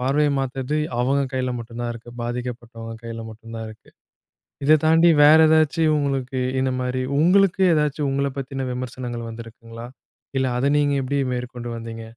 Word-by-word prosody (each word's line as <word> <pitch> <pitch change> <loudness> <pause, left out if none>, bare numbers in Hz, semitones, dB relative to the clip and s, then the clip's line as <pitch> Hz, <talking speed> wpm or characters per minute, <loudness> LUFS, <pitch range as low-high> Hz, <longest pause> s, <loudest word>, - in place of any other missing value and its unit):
பார்வைய 145 +3 +2
மாத்தறது, 135 +2 -3 0.2
அவங்க 135 +3 +2
கையில 130 -1 -1
மட்டும்தான் 120 +1 -5
இருக்கு. 115 +1 -11
பாதிக்கப்பட்டவங்க 120 -1 -6
கையில 115 0 -6
மட்டும் 115 +1 -12
தான் 115 - -5
இருக்கு. 110 - -17 0.8
இத 155 +1 +6
தாண்டி 165 +2 +5
வேற 155 +2 +8
ஏதாச்சும் 155 0 +3
உங்களுக்கு 135 -2 -2 0.2
இந்த 130 0 +1
மாரி 125 0 -2 0.2
உங்களுக்கு 190 +3 +4
ஏதாச்சும் 150 -2 0
உங்கள 140 +1 0
பத்தின 135 0 -4
விமர்சனங்கள் 125 -2 -5
வந்திருக்குங்களா? 115 0 -10 0.5
இல்ல 130 - +1
அத 130 - 0
நீங்க 145 -1 +2
எப்டி 140 +2 -1
மேற்கொண்டு 125 -1 -5
வந்தீங்க? 115 0 -7
130 Hz, 150 wpm, -22 LUFS, 120-145 Hz, 0.8 s, வேற